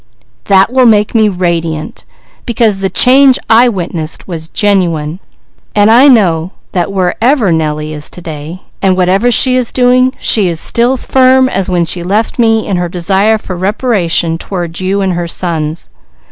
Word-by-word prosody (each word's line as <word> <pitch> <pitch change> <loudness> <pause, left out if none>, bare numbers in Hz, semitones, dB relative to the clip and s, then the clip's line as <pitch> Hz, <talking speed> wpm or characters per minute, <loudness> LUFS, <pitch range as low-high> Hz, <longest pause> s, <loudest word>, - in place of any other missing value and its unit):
"That 195 +4 +2
will 260 -1 +4
make 210 -2 +2
me 220 -2 +2
radiant, 170 -4 -3 0.4
because 225 -4 +1
the 195 - -1
change 265 +3 +4
I 235 +2 +5
witnessed 170 -6 -5
was 165 -3 -6
genuine. 170 -5 -1 0.6
I 225 +6 +5
know 185 - +2 0.2
that 180 0 -2
wherever 200 +4 0
Nellie 155 -1 -2
is 150 -1 -5
to - - -11
day 160 +1 -9 0.2
and 190 -1 +1
whatever 190 +6 +1
she 255 +2 +3
is 250 -2 0
doing, 255 0 +2
she 210 -4 +2
is 170 -2 -2
still 240 +8 0
firm 260 +1 +2
as 195 -7 -2
when 175 -2 0
she 175 +1 -2
left 210 +7 -2
me 225 -2 +2
in 190 - -2
her 175 -1 -2
desire 195 +5 +1
for 190 -3 -8
reparation 180 -4 -1
toward 175 -3 -5
you 190 +2 -1
and 190 -1 -1
her 170 0 -3
sons. 165 - -4
190 Hz, 160 wpm, -10 LUFS, 170-230 Hz, 0.6 s, I